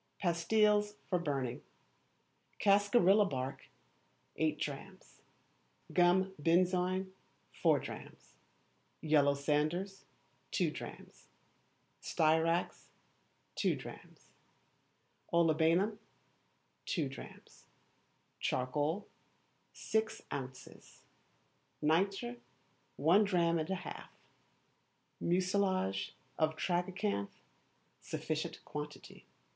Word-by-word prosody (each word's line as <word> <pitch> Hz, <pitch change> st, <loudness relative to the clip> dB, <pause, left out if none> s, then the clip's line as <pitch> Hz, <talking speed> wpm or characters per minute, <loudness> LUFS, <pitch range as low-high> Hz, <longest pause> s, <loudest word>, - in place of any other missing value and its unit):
Pastilles 210 Hz, +4 st, +2 dB
for 180 Hz, -, +1 dB
Burning. 140 Hz, -7 st, -2 dB, 1.0 s
Cascarilla 205 Hz, 0 st, +5 dB
bark, 130 Hz, 0 st, -4 dB, 0.7 s
eight 155 Hz, -1 st, +1 dB
drachms; 170 Hz, +7 st, -7 dB, 0.7 s
gum 185 Hz, +2 st, +4 dB
benzoin, 180 Hz, +3 st, +2 dB, 0.4 s
four -, -, +3 dB
drachms; -, -, -10 dB, 0.7 s
yellow 145 Hz, -2 st, +4 dB
sanders, 155 Hz, +7 st, -1 dB, 0.4 s
two -, -, +1 dB
drachms; -, -, -10 dB, 0.7 s
styrax, 165 Hz, +1 st, +1 dB, 0.7 s
two -, -, +1 dB
drachms; -, -, -11 dB, 1.0 s
olibanum, 170 Hz, +5 st, +3 dB, 0.9 s
two 160 Hz, -6 st, 0 dB
drachms; 135 Hz, -, -12 dB, 0.7 s
charcoal, 145 Hz, +9 st, -1 dB, 0.6 s
six 220 Hz, 0 st, -1 dB
ounces; 130 Hz, -1 st, -8 dB, 0.8 s
nitre, 195 Hz, +10 st, +1 dB, 0.6 s
one 170 Hz, +9 st, +5 dB
drachm 170 Hz, -4 st, +2 dB
and 155 Hz, +2 st, -3 dB
a 190 Hz, -, 0 dB
half; 185 Hz, -, -7 dB, 1.1 s
mucilage 185 Hz, -, 0 dB, 0.2 s
of 155 Hz, 0 st, +2 dB
tragacanth, 180 Hz, -, -1 dB, 0.6 s
sufficient -, -, -4 dB
quantity. 150 Hz, 0 st, -8 dB
175 Hz, 70 wpm, -34 LUFS, 150-195 Hz, 1.1 s, Cascarilla